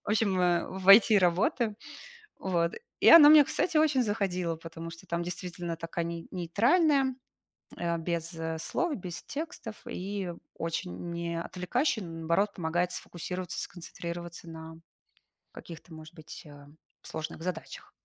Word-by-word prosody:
В - - -9
общем, 205 -3 +2 0.4
в 190 +1 -5
IT 215 +1 +9
работаю. 205 +5 +1 0.6
Вот. 170 -3 0 0.3
И - - +6
она 310 -3 +11
мне, 305 -1 +9
кстати, 335 -4 0
очень 295 -5 +3
заходила, 185 -5 -1
потому 165 0 -8
что 165 +3 -12
там, 170 0 -1
действительно, 175 -1 -5
такая 165 +1 -3
ней 170 0 -6
нейтральная, 260 - +2 0.6
э, 170 -1 -1
без 170 0 -3 0.3
слов, 345 -5 -1
без 180 -3 -7
текстов. 285 -7 -6
И 190 -1 -4 0.2
очень 170 +1 -4
не 170 0 -3
отвлекающий, 205 - -1
наоборот, 170 +4 -1
помогает 175 +1 -1
сфокусироваться, 180 0 -5
сконцентрироваться 170 0 -7
на 160 0 -9 0.8
каких-то, 165 0 -11
может 155 +1 -12
быть, 155 -3 -10
э, 145 -1 -13 0.4
сложных 155 +1 -6
задачах. 180 -1 -6
175 Hz, 130 wpm, -29 LUFS, 165-205 Hz, 0.8 s, она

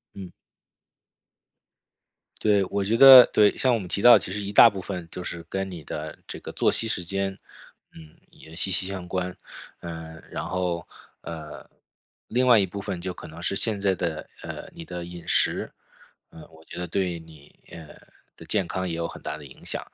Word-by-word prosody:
嗯。 95 -2 -9 2.1
对， 105 -2 +3
我 100 - 0
觉 110 +4 +1
得 130 -1 +11
对， 105 -1 +3
像 130 - +2
我 120 - +3
们 95 -5 -6
提 100 - -2
到 120 0 +9
其 90 -1 -5
实 105 - -3
一 100 0 -5
大 105 - +9
部 100 -4 -2
分 90 -3 -6
就 90 - -7
是 85 -1 -7
跟 95 +2 -3
你 85 -4 -9
的 75 +1 -6
这 - - -6
个 - - -8
作 - - +2
息 115 - -1
时 90 -5 -2
间， 95 +1 -2 0.6
嗯， 80 -1 -14 0.2
也 80 +1 -15
息 95 +3 -2
息 95 0 +1
相 95 -2 -6
关。 90 0 -3 0.4
呃， 80 -1 -8
然 - - -4
后 90 -1 -3 0.3
呃， 80 -2 -9 0.6
另 125 +1 +1
外 120 -2 +7
一 100 - +3
部 100 +2 -7
分 100 -3 -4
就 90 +1 -5
可 - - -11
能 80 +1 -11
是 100 - 0
现 105 0 0
在 100 -1 +2
的， 80 -3 -4
呃， - - -8
你 - - -9
的 90 +1 -7
饮 85 0 -10
食， - - +2 0.6
呃， - - -13
我 80 0 -19
觉 85 - -8
得 90 - -4
对 90 -1 -2
你， 80 -3 -17
呃， 80 -3 -10 0.5
的 - - -13
健 100 -5 0
康 95 0 -3
也 85 - -3
有 85 0 -2
很 - - -11
大 - - -5
的 75 - -12
影 65 - -15
响。 - - -2
90 Hz, 215 characters per minute, -25 LUFS, 85-100 Hz, 2.1 s, 得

